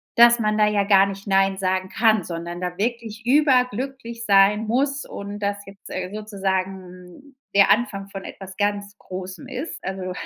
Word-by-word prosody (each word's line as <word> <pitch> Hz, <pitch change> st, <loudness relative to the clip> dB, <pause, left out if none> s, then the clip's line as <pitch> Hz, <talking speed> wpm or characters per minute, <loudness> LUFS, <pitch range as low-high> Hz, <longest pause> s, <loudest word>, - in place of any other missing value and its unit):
dass 235 Hz, 0 st, +7 dB
man 215 Hz, -2 st, 0 dB
da 210 Hz, -1 st, +4 dB
ja 210 Hz, -1 st, +2 dB
gar 195 Hz, -1 st, +5 dB
nicht 195 Hz, 0 st, -7 dB
nein 195 Hz, -1 st, +2 dB
sagen 185 Hz, 0 st, -1 dB
kann, 220 Hz, -3 st, +2 dB
sondern 170 Hz, 0 st, -6 dB
da 180 Hz, 0 st, -4 dB
wirklich 230 Hz, +1 st, -3 dB
überglücklich 250 Hz, -3 st, +1 dB
sein 205 Hz, +1 st, +4 dB
muss 275 Hz, +4 st, 0 dB
und 200 Hz, +1 st, -7 dB
das 205 Hz, 0 st, -3 dB
jetzt 195 Hz, 0 st, -13 dB, 0.2 s
sozusagen 190 Hz, +3 st, -5 dB, 0.2 s
der 200 Hz, -, +6 dB
Anfang 210 Hz, -4 st, 0 dB
von 195 Hz, -1 st, -8 dB
etwas 190 Hz, -1 st, -10 dB
ganz 205 Hz, 0 st, -2 dB
Großem 185 Hz, +7 st, -8 dB
ist. 265 Hz, +5 st, -6 dB
Also, 190 Hz, -1 st, -4 dB
205 Hz, 160 wpm, -23 LUFS, 190-230 Hz, 0.2 s, dass